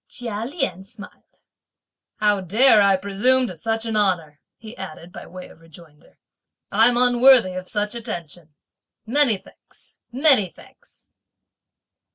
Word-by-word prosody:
Chia 230 -3 -5
Lien 270 - -3
smiled. 205 +1 -15 0.7
"How 210 -2 +1
dare 215 +5 +4
I 200 -1 +4
presume 205 +7 +1
to 185 - -7
such 225 +7 -3
an 225 -1 -3
honour," 170 -8 -1 0.2
he 225 0 -12
added 175 -2 -10
by - - -11
way 180 +1 -11
of - - -19
rejoinder; 165 -2 -19 0.5
"I'm 230 +4 +3
unworthy 245 -4 +4
of 185 0 -7
such 210 +1 -3
attention! 175 - -8 0.5
Many 245 -2 +2
thanks, - - -22
many 260 - +3
thanks." - - -21
210 Hz, 130 wpm, -21 LUFS, 185-240 Hz, 0.7 s, dare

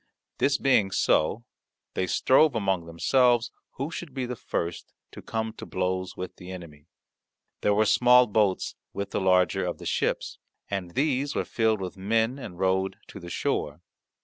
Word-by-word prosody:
This 140 0 +3
being 125 -9 +3
so, 95 +3 +1 0.5
they 95 - -1
strove 135 - +4
among 95 -6 0
themselves 120 +7 +2 0.2
who 140 +5 -4
should 160 -5 -7
be 130 -2 -2
the 125 0 -4
first 85 -6 -4 0.2
to - - -10
come 110 -1 -3
to - - -9
blows 95 0 -2
with 90 - -6
the 90 - -11
enemy. 85 -5 -10 0.7
There 105 - +2
were 110 +1 +3
small 125 +3 +6
boats 105 -3 +1 0.2
with 100 0 -4
the - - -1
larger 90 0 +3
of 90 -1 -3
the - - -11
ships, - - -1 0.3
and 90 -3 -4
these 140 0 0
were - - 0
filled 110 -3 +1
with 95 0 -5
men 115 +6 0
and 90 -9 -8
rowed 95 +1 +1
to - - -9
the 85 -2 -9
shore. 75 -1 -2
100 Hz, 170 wpm, -27 LUFS, 90-125 Hz, 0.7 s, small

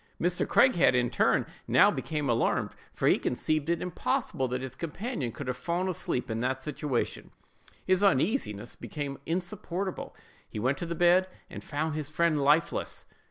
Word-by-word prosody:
Mr. 175 +1 +1
Craighead, 180 - +5
in 125 -1 +3
his - - -12
turn, - - +3 0.2
now - - +6
became 150 -2 -3
alarmed; 120 -2 +1 0.2
for - - -1
he - - +4
conceived 155 +4 -1
it 170 - 0
impossible 180 - -1
that 125 +1 -3
his 130 - -6
companion 170 - -4
could 140 - -7
have 125 - -1
fallen 170 +7 -1
asleep 165 -8 -2
in 110 - -2
that 130 +2 -1
situation; 135 -2 -3 0.6
his 185 0 +3
uneasiness 185 - +1
became 140 -2 -5
insupportable; 180 +1 -3 0.3
he - - -7
went 130 +5 0
to 170 - -4
the 170 - -3
bed, 175 +2 +4 0.2
and - - -8
found 155 +1 -2
his 155 -1 -3
friend 155 -1 +1
lifeless! 150 +4 +1
155 Hz, 165 wpm, -29 LUFS, 130-175 Hz, 0.6 s, now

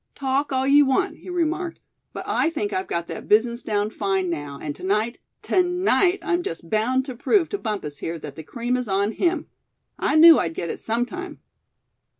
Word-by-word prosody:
"Talk 275 +1 -1
all 260 0 +1
you 285 +2 +6
want," 370 +9 +1
he - - -12
remarked; 345 0 -1 0.3
"but - - -6
I - - +1
think 215 -11 -3
I've 185 +1 -2
got 170 0 -2
that - - -7
business 235 +3 +3
down 210 0 -1
fine, 195 -4 -1
now; 145 -3 -5
and 145 -2 -5
to - - -12
night, 215 +5 0 0.2
to 370 - +3
night 360 +1 +2
I'm 355 -2 0
just 165 - -6
bound 250 +5 +1
to 260 -3 -6
prove 340 - +2
to 405 - -3
Bumpus 200 - -4
here 165 +1 -4
that 150 -3 -9
the 160 - -7
cream 240 - -2
is 250 -2 -3
on 200 +2 +1
him. 340 +3 0 0.5
I - - +1
knew 325 0 +9
I'd 165 -2 -2
get 170 - -3
it - - -6
sometime." 245 +12 -3
240 Hz, 200 wpm, -23 LUFS, -, 0.5 s, knew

